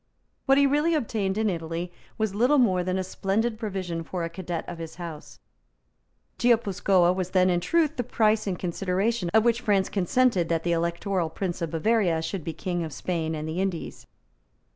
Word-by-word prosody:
What 270 0 +5
he 280 - +5
really 295 +4 +2
obtained 215 -8 -1
in 220 0 +1
Italy 170 -1 -3 0.2
was 220 -3 -1
little 250 +8 +3
more 190 -8 +3
than 185 +1 -1
a 190 - -1
splendid 215 +5 -1
provision 185 -6 -3
for 175 +1 -4
a 165 - -3
cadet 170 -1 -5
of 170 - -7
his 165 -1 -7
house. 170 -4 -8 1.0
Guipuscoa 200 -6 +3
was 185 -1 -3
then 185 -1 +3
in 175 - +2
truth 315 - +1
the 245 - 0
price 220 -3 +1
in 190 - 0
consideration 185 +3 -1
of 220 +1 +4
which 235 0 +2
France 200 -5 +2
consented 195 -1 +2
that 165 -1 0
the 175 - 0
Electoral 170 +1 0
Prince 180 +1 -4
of 165 - -1
Bavaria 175 0 +1
should 165 +1 -4
be 165 - -3
King 175 +2 -3
of 160 - -5
Spain 160 +3 -2
and 155 0 -4
the 165 +4 -2
Indies. 190 -4 -4
185 Hz, 185 wpm, -26 LUFS, 170-220 Hz, 1.0 s, What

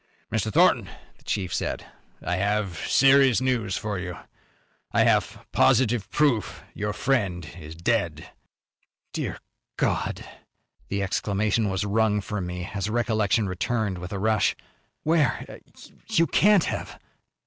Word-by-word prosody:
"Mr. 110 -1 -1
Thornton," - - +4 0.3
the - - -26
chief 95 -3 -2
said, - - -2 0.4
"I 90 - -1
have 100 -2 0
serious 135 -2 +5
news 125 -6 0
for 105 -4 -3
you. 90 -1 -5 0.7
I - - +4
have - - +1
positive 120 -4 +3
proof 140 -8 +1
your 105 0 -2
friend 100 -8 0
is 80 0 -9
dead." 85 -4 -1 0.8
"Dear - - -3 0.4
God!" - - -1 0.6
The 100 0 -1
exclamation 105 +2 0
was 95 +1 -1
wrung 105 0 +2
from 100 -2 -4
me 90 0 -5
as 100 0 -2
recollection 110 -2 +1
returned 95 +1 -1
with 90 +1 -7
a 100 - -3
rush. 110 +1 +2 0.5
"Where? 155 -6 0 0.5
You 165 - +3
can't 200 +3 +4
have!" - - -4
105 Hz, 125 wpm, -25 LUFS, 95-120 Hz, 0.8 s, serious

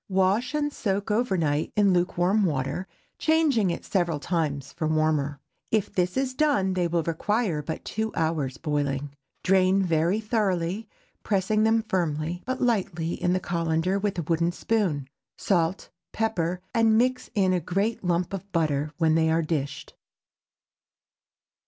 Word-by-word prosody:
Wash 195 +8 +1
and 295 -1 0
soak 200 0 -1
over 210 -3 +1
night 150 -2 0
in 200 -2 +4
lukewarm 180 +3 +2
water, 145 +2 -1 0.3
changing 305 - +3
it 170 - -4
several 170 -6 0
times 145 -4 -2
for 160 -3 -2
warmer. 155 -2 +1 0.3
If 215 -3 0
this 180 +2 0
is 265 -1 0
done 255 -10 +2
they 180 -2 +1
will 170 -1 0
require 170 +1 0
but 160 +2 -6
two 220 0 -2
hours' 160 -5 -1
boiling. 145 -2 -2 0.3
Drain 190 +1 +4
very 170 +3 +1
thoroughly, 205 -2 -1 0.3
pressing 210 +2 +1
them 225 0 +3
firmly, 170 -3 -1
but 260 0 -2
lightly, 185 -8 0
in 180 - 0
the 185 - +1
cullender 170 +2 0
with 205 -2 -1
a 170 - -1
wooden 170 +2 +1
spoon; 175 -9 -1 0.3
salt, 175 -2 0 0.2
pepper 180 -6 -1
and 225 -2 +4
mix 255 +2 +1
in 190 -2 +3
a 180 - +2
great 195 +7 -1
lump 175 +1 0
of 195 +1 -6
butter 155 -4 0
when 160 -2 +3
they 160 0 +3
are 165 +1 +2
dished. 145 -3 -3
180 Hz, 150 wpm, -26 LUFS, 160-210 Hz, 0.3 s, in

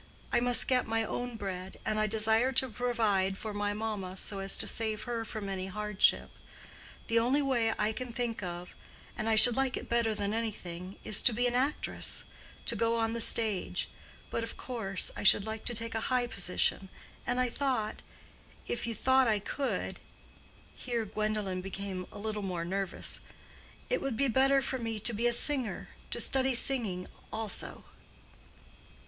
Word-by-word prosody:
I 240 - +5
must 245 0 +3
get 255 -1 +2
my 225 0 +1
own 245 +2 -4
bread, 190 -3 -6
and 215 0 0
I 215 - +2
desire 220 +4 +2
to 260 0 +3
provide 215 -5 0
for 215 0 -5
my 205 0 -1
mamma, 205 -3 -4
so 200 +1 +1
as 195 0 +1
to - - -1
save 220 -1 0
her 235 -2 -3
from 215 -2 -6
any 190 -1 -3
hardship. 210 0 +1 0.7
The 230 0 +2
only 260 +5 +2
way 240 -5 +1
I 210 +1 0
can 250 +1 -5
think 235 -2 -2
of—and 180 +4 -7
I 220 - +4
should 225 +2 +9
like 270 -1 0
it - - -7
better 235 -2 +1
than 205 0 -2
anything—is 195 -3 -3
to 245 - +5
be 240 +3 0
an 245 - +1
actress—to 255 -2 -2
go 230 +1 +1
on 225 0 0
the 235 - -3
stage. 215 -4 +2 0.4
But, 230 - -1
of 230 - -6
course, 215 -7 -2
I - - -5
should 205 0 +7
like 220 0 -5
to 240 - 0
take 230 +1 -3
a 225 - -2
high 250 -1 +2
position, 195 -2 +1 0.4
and 245 +1 +1
I 250 -1 +2
thought—if 240 -2 -4
you 230 - -2
thought 260 +1 +3
I 215 -2 +3
could"—here 240 0 -5
Gwendolen 210 -3 -2
became 190 -1 -5
a - - -10
little 210 0 -3
more 180 -4 -3
nervous—"it 195 - -4
would 270 -5 -2
be 275 - +2
better 270 +3 +3
for 260 0 -2
me 225 -2 -3
to 235 +3 +1
be 230 +3 +1
a - - +3
singer—to 255 0 0
study 265 -1 +4
singing 220 -9 +2 0.3
also." 220 -2 -3
225 Hz, 165 wpm, -31 LUFS, 205-245 Hz, 0.7 s, should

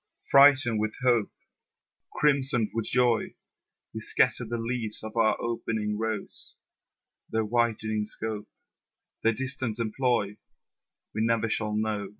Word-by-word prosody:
Freighted 140 -5 +6
with 110 0 -2
hope, 120 -4 +3 0.8
Crimsoned 135 -7 +2
with 115 -1 -2
joy, 120 -2 +1 0.6
We 110 - -5
scatter 125 +3 +2
the 120 +1 -3
leaves 115 -2 -3
of 110 +1 -7
our 115 -1 +2
opening 110 -2 -2
rose; 110 -1 -3 0.7
Their 110 0 0
widening 110 -2 0
scope, 110 0 -4 0.7
Their 115 - +2
distant 130 -2 -1
employ, 115 -3 -1 0.8
We 110 - -2
never 115 0 +1
shall 105 0 -1
know. 105 -2 -2
115 Hz, 120 wpm, -27 LUFS, 110-120 Hz, 0.8 s, Freighted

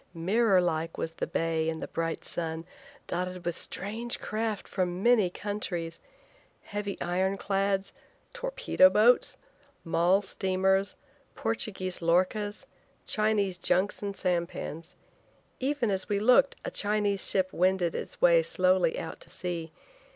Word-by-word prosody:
Mirror 195 +3 +3
like 165 -1 -1
was 165 - -2
the 165 - -4
bay 165 -1 0
in 160 0 -3
the - - -5
bright 165 0 -3
sun, 165 -1 -4 0.4
dotted 180 0 -4
with 175 -1 -1
strange 225 +8 -4
craft 215 -1 -3
from 180 0 -2
many 235 -6 +5
countries. 175 -4 -4 0.6
Heavy 205 -1 -4
iron 185 +3 0
clads, 195 0 0 0.4
torpedo - - +3
boats, 240 +1 +4 0.5
mall 175 +3 +3
steamers, 190 0 +1 0.4
Portuguese 190 -5 -2
lorchas, 185 +5 +1 0.4
Chinese 210 -4 +1
junks 185 +3 +1
and 200 -1 -4
sampans. 170 -1 -3 0.6
Even 265 -4 0
as 190 -1 -1
we 205 - +1
looked, 250 +6 +5
a - - -3
Chinese 205 -1 +1
ship 185 -1 +1
wended 180 -1 +2
its - - -6
way 170 -1 +6
slowly 185 +1 +2
out 160 - -6
to - - -11
sea. 175 -3 -5
190 Hz, 130 wpm, -29 LUFS, 175-205 Hz, 0.6 s, way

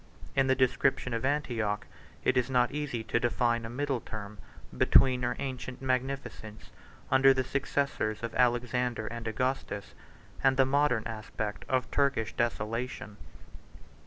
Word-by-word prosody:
In 135 -1 +3
the 130 - +4
description 130 -1 +1
of 115 - -2
Antioch, 120 -7 0 0.4
90 - - -1
it - - -13
is 125 0 +2
not 125 -2 +3
easy 140 -6 -3
to 110 - 0
define 120 -1 +1
a - - -5
middle 135 +1 -1
term 105 -2 -8 0.4
between 130 -2 +5
her 125 0 0
ancient 130 -1 -5
magnificence, 130 -4 -3 0.4
under 135 0 +6
the 130 - +1
successors 130 -4 -1
of 115 - -3
Alexander 125 -1 +1
and 115 0 -5
Augustus, 110 -3 -2 0.5
and 135 -1 +4
the 135 - +6
modern 140 -4 +2
aspect 110 -1 -5
of 130 -2 0
Turkish 140 -6 +1
desolation. 115 -1 -2
125 Hz, 140 wpm, -30 LUFS, 115-135 Hz, 0.5 s, under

